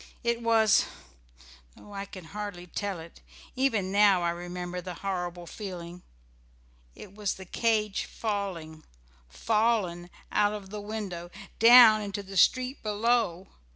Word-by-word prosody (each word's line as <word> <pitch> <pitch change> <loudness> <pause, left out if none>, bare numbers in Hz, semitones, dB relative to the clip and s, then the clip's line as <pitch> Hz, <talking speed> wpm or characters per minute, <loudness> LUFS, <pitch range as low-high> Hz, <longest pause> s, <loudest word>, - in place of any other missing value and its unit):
It 235 0 0
was 225 -2 +4 0.9
no 205 - -15
I 200 0 -5
can 185 -3 -11
hardly 200 0 -7
tell 195 +1 -4
it, 165 +1 -13 0.3
even 225 -8 0
now 200 -3 +4
I 170 - +1
remember 175 +1 -6
the 180 0 -7
horrible 175 -2 -3
feeling 180 -3 -8 0.9
it 200 - -12
was 205 -1 -2
the 190 - -10
cage 215 +1 0
falling, 185 -8 -4 0.5
fallen 210 - 0 0.2
out 205 0 +2
of 200 -2 -8
the 210 -1 -5
window, 200 -5 -6 0.3
down 230 -2 +8
into 205 -1 -5
the 195 0 -10
street 255 - +3
below. 215 -4 0
200 Hz, 130 wpm, -28 LUFS, 175-215 Hz, 0.9 s, down